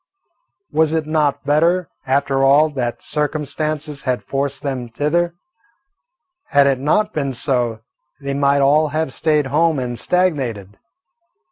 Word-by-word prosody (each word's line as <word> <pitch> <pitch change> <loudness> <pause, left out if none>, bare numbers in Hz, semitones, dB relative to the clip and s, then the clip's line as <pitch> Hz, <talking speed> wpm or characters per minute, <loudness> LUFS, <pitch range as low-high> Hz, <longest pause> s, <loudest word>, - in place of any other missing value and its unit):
Was 160 0 +2
it 160 -1 0
not 150 -2 0
better, 170 +5 +2 0.2
after 135 0 +1
all, 145 +3 +5
that 120 -4 -3
circumstances 150 0 -3
had 130 -2 -2
forced 140 +1 -3
them 130 -4 -3
thither? 165 +7 0 1.1
Had 140 0 +4
it 135 -2 +2
not 210 +10 +1
been 140 -3 -2
so, 120 -3 -1 0.4
they 140 -1 -4
might 140 0 +2
all 150 +3 +4
have 155 -2 -2
stayed 150 -2 +1
home 160 0 +3
and 120 -2 -4
stagnated. 130 - -1
145 Hz, 130 wpm, -19 LUFS, 135-155 Hz, 1.1 s, all